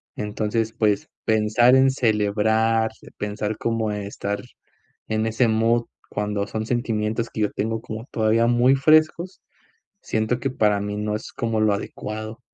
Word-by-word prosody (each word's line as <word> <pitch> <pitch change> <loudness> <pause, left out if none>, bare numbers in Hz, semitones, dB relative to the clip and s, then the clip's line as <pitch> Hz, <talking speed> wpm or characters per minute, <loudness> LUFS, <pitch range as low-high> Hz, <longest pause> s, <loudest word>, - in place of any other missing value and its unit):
Entonces, 110 +2 -2
pues, 105 -3 0 0.2
pensar 110 +3 +4
en 135 0 +5
celebrar, 110 -1 +1 0.3
pensar 105 +1 -3
como 115 -2 -1
estar 100 0 -4 0.7
en 110 0 0
ese 115 +2 +2
mood 115 +1 +2 0.2
cuando 105 -1 -2
son 110 +1 -3
sentimientos 115 -2 -1
que 110 - -5
yo 105 - +1
tengo 110 +2 -2
como 110 +2 -7
todavía 115 +1 +2
muy 120 +3 +4
frescos, 155 +5 +2 0.6
siento 110 +3 -1
que 135 - -1
para 105 -4 +2
mí 105 0 -3
no 105 0 -2
es 110 - -7
como 115 -2 -1
lo 105 -1 +3
adecuado. 110 +2 -5
110 Hz, 145 wpm, -23 LUFS, 105-115 Hz, 0.7 s, en